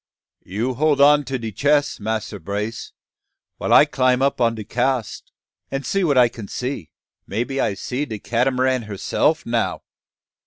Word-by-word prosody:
"You 110 Hz, +8 st, -2 dB
hold 145 Hz, +2 st, +2 dB
on 145 Hz, +1 st, +6 dB
to 135 Hz, +1 st, -2 dB
de 115 Hz, -2 st, -5 dB
chess, 145 Hz, +7 st, +1 dB
Massa 110 Hz, -1 st, -3 dB
Brace, 105 Hz, +4 st, -4 dB, 0.7 s
while -, -, -3 dB
I -, -, +8 dB
climb 130 Hz, 0 st, +1 dB
up 140 Hz, -2 st, +1 dB
on 115 Hz, -1 st, +3 dB
de 110 Hz, -, -6 dB
cask, 125 Hz, +2 st, -1 dB, 0.5 s
and 135 Hz, 0 st, -4 dB
see 195 Hz, -1 st, 0 dB
what 145 Hz, -6 st, +2 dB
I 125 Hz, -1 st, +7 dB
can 115 Hz, -3 st, -9 dB
see. 125 Hz, -, -4 dB, 0.4 s
May 110 Hz, +4 st, -1 dB
be 135 Hz, +1 st, -3 dB
I -, -, +2 dB
may 100 Hz, -, -4 dB
see 130 Hz, +8 st, -3 dB
de 110 Hz, -6 st, -6 dB
Catamaran 125 Hz, +2 st, 0 dB
herseff 100 Hz, -2 st, 0 dB
now." -, -, -1 dB
125 Hz, 170 wpm, -21 LUFS, 110-135 Hz, 0.7 s, I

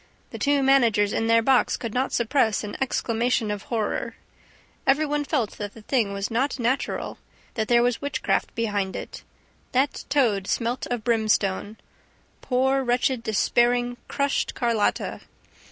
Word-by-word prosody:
The -, -, -7 dB
two 285 Hz, -1 st, +2 dB
managers 230 Hz, -7 st, +3 dB
in 225 Hz, -, 0 dB
their 230 Hz, 0 st, +4 dB
box 260 Hz, 0 st, +3 dB
could 230 Hz, -3 st, -5 dB
not 260 Hz, +2 st, 0 dB
suppress 235 Hz, -2 st, +1 dB
an 205 Hz, -1 st, -6 dB
exclamation 235 Hz, -3 st, 0 dB
of 205 Hz, -1 st, -4 dB
horror. 220 Hz, -3 st, -2 dB, 0.7 s
Every 280 Hz, +3 st, +4 dB
one 295 Hz, 0 st, -1 dB
felt 275 Hz, -7 st, -1 dB
that 205 Hz, -1 st, -5 dB
the 225 Hz, -, -13 dB
thing 225 Hz, -4 st, +1 dB
was 200 Hz, +1 st, -3 dB
not 260 Hz, +6 st, 0 dB
natural, 250 Hz, +2 st, -2 dB, 0.3 s
that 220 Hz, -2 st, -2 dB
there 240 Hz, 0 st, +4 dB
was 245 Hz, -1 st, 0 dB
witchcraft 285 Hz, 0 st, -1 dB
behind 205 Hz, -4 st, -1 dB
it. -, -, -7 dB, 0.5 s
That 265 Hz, +3 st, 0 dB
toad 220 Hz, -9 st, +2 dB
smelt 240 Hz, +2 st, -1 dB
of 245 Hz, -3 st, -3 dB
brimstone. 215 Hz, -2 st, 0 dB, 0.6 s
Poor, 265 Hz, +1 st, +1 dB
wretched, 250 Hz, 0 st, +1 dB
despairing, 240 Hz, +2 st, +1 dB
crushed 280 Hz, -1 st, -1 dB
Carlotta! 230 Hz, -4 st, 0 dB
240 Hz, 145 wpm, -25 LUFS, 220-265 Hz, 0.7 s, their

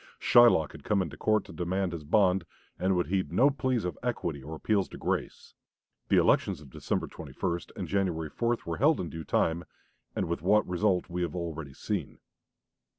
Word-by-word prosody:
Shylock 120 Hz, -10 st, +6 dB
had 75 Hz, -3 st, -12 dB
come 100 Hz, -3 st, +2 dB
into 80 Hz, -, -7 dB
court 110 Hz, -1 st, +1 dB
to -, -, -11 dB
demand 90 Hz, +2 st, -1 dB
his 80 Hz, -2 st, -5 dB
bond, 95 Hz, +2 st, +3 dB, 0.4 s
and 95 Hz, +1 st, +2 dB
would 90 Hz, -, +1 dB
heed 95 Hz, 0 st, -1 dB
no 140 Hz, +4 st, +5 dB
pleas 130 Hz, -6 st, -1 dB
of 90 Hz, -3 st, -4 dB
equity 70 Hz, -, -2 dB
or 75 Hz, +4 st, -7 dB
appeals 100 Hz, +4 st, 0 dB
to -, -, -9 dB
grace. -, -, -3 dB, 0.6 s
The -, -, +4 dB
elections -, -, +3 dB
of 70 Hz, -4 st, -14 dB
December -, -, -2 dB
21 85 Hz, 0 st, -4 dB, 0.2 s
and -, -, -4 dB
January 90 Hz, -6 st, -1 dB
4 120 Hz, 0 st, 0 dB
were 85 Hz, -, -3 dB
held 150 Hz, +5 st, +4 dB
in 85 Hz, -, -4 dB
due 80 Hz, 0 st, -6 dB
time, 85 Hz, +2 st, +1 dB, 0.5 s
and -, -, -1 dB
with 85 Hz, -2 st, -2 dB
what 105 Hz, +4 st, +3 dB
result 90 Hz, 0 st, +1 dB
we 90 Hz, 0 st, -3 dB
have 85 Hz, -4 st, -2 dB
already 80 Hz, -5 st, -5 dB
seen. 100 Hz, -6 st, -3 dB
90 Hz, 190 wpm, -29 LUFS, 80-105 Hz, 0.6 s, Shylock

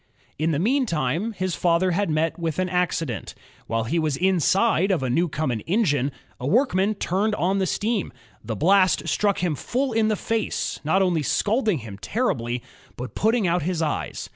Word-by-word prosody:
In 160 Hz, +1 st, +1 dB
the 155 Hz, -, +1 dB
meantime 195 Hz, -, 0 dB
his 185 Hz, -2 st, -2 dB
father 175 Hz, +2 st, +2 dB
had 200 Hz, +1 st, 0 dB
met 160 Hz, +2 st, 0 dB
with 165 Hz, -2 st, -2 dB
an 185 Hz, 0 st, 0 dB
accident. 170 Hz, -, -2 dB, 0.3 s
While 115 Hz, 0 st, 0 dB
he 160 Hz, +10 st, 0 dB
was 155 Hz, -4 st, 0 dB
inside 190 Hz, +2 st, +2 dB
of 180 Hz, -8 st, +1 dB
a 130 Hz, -, -1 dB
Newcomen 150 Hz, -5 st, 0 dB
engine, 150 Hz, -, +1 dB, 0.3 s
a 125 Hz, -, -3 dB
workman 210 Hz, -, +2 dB
turned 200 Hz, +3 st, 0 dB
on 190 Hz, +2 st, +1 dB
the 190 Hz, -, +1 dB
steam. 215 Hz, +1 st, -1 dB, 0.3 s
The 110 Hz, 0 st, -4 dB
blast 185 Hz, -, +3 dB
struck 200 Hz, -3 st, +1 dB
him 175 Hz, -3 st, +1 dB
full 255 Hz, -, -2 dB
in 220 Hz, -1 st, +2 dB
the 215 Hz, -, +1 dB
face, 225 Hz, +1 st, -2 dB
not 185 Hz, +6 st, +3 dB
only 175 Hz, -4 st, +1 dB
scalding 215 Hz, -, +1 dB
him 110 Hz, -6 st, -9 dB
terribly, 120 Hz, -, -1 dB, 0.3 s
but 125 Hz, +1 st, -6 dB
putting 220 Hz, 0 st, +1 dB
out 175 Hz, +1 st, +1 dB
his 165 Hz, +1 st, -1 dB
eyes. 150 Hz, -, -3 dB
180 Hz, 175 wpm, -24 LUFS, 150-205 Hz, 0.3 s, blast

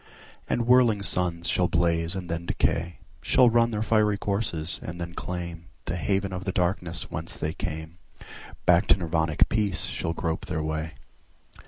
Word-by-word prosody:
And 120 Hz, -, 0 dB
whirling 120 Hz, -4 st, +4 dB
suns 85 Hz, -3 st, +1 dB
shall 90 Hz, -, +2 dB
blaze 85 Hz, 0 st, +1 dB
and 90 Hz, -2 st, -5 dB
then 85 Hz, 0 st, -4 dB
decay, 85 Hz, +1 st, 0 dB, 0.3 s
Shall 125 Hz, +8 st, +4 dB
run 115 Hz, 0 st, +4 dB
their 110 Hz, -2 st, -2 dB
fiery 105 Hz, -2 st, +2 dB
courses 100 Hz, -6 st, -1 dB
and 85 Hz, +2 st, -7 dB
then 85 Hz, 0 st, -5 dB
claimThe 85 Hz, -2 st, -6 dB
haven 95 Hz, +1 st, -1 dB
of 90 Hz, 0 st, -4 dB
the 95 Hz, -, -2 dB
darkness 90 Hz, -1 st, -1 dB
whence 80 Hz, 0 st, -3 dB
they 80 Hz, 0 st, -2 dB
came; 80 Hz, 0 st, -6 dB, 0.7 s
Back -, -, +4 dB
to -, -, +5 dB
Nirvanic 80 Hz, -3 st, +1 dB
peace 100 Hz, -6 st, +1 dB
shall 80 Hz, -, -2 dB
grope 80 Hz, -1 st, -3 dB
their 80 Hz, -1 st, -2 dB
way. 80 Hz, +1 st, -3 dB
85 Hz, 160 wpm, -26 LUFS, 80-100 Hz, 0.7 s, to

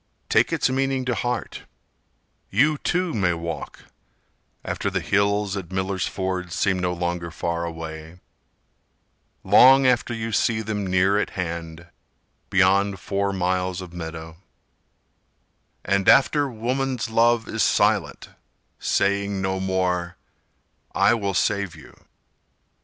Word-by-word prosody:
Take -, -, +3 dB
its -, -, +1 dB
meaning 135 Hz, 0 st, -1 dB
to 125 Hz, -, 0 dB
heart: 120 Hz, +3 st, -3 dB, 0.9 s
You 140 Hz, +8 st, +2 dB
too 180 Hz, -2 st, -1 dB
may 90 Hz, -5 st, +1 dB
walk, 85 Hz, 0 st, -6 dB, 0.8 s
after -, -, -2 dB
the -, -, -1 dB
hills 100 Hz, 0 st, +1 dB
at 95 Hz, -2 st, -6 dB
Miller's 95 Hz, 0 st, -1 dB
Ford 95 Hz, -2 st, -3 dB
Seem 95 Hz, +2 st, 0 dB
no 90 Hz, -1 st, 0 dB
longer 85 Hz, -1 st, -3 dB
far 85 Hz, 0 st, -3 dB
away; 80 Hz, 0 st, -8 dB, 1.2 s
Long 130 Hz, +7 st, +7 dB
after 125 Hz, -2 st, +2 dB
you 115 Hz, 0 st, -4 dB
see 110 Hz, +2 st, +1 dB
them 105 Hz, -2 st, -3 dB
near 95 Hz, +2 st, +2 dB
at -, -, -1 dB
hand, 85 Hz, -1 st, -5 dB, 0.6 s
Beyond 95 Hz, +1 st, +3 dB
four 100 Hz, +1 st, -1 dB
miles 90 Hz, -1 st, -1 dB
of 90 Hz, -2 st, -9 dB
meadow; 80 Hz, -1 st, -7 dB, 1.5 s
And 100 Hz, 0 st, +2 dB
after 145 Hz, +1 st, +4 dB
woman's 125 Hz, +2 st, -2 dB
love 115 Hz, 0 st, +3 dB
is -, -, -2 dB
silent -, -, +1 dB, 0.5 s
Saying 100 Hz, 0 st, 0 dB
no 95 Hz, 0 st, -1 dB
more: 90 Hz, -2 st, -1 dB, 0.8 s
"I -, -, +4 dB
will 100 Hz, -4 st, -2 dB
save 100 Hz, -3 st, 0 dB
you." 75 Hz, -, -15 dB
95 Hz, 120 wpm, -23 LUFS, 90-110 Hz, 1.5 s, Long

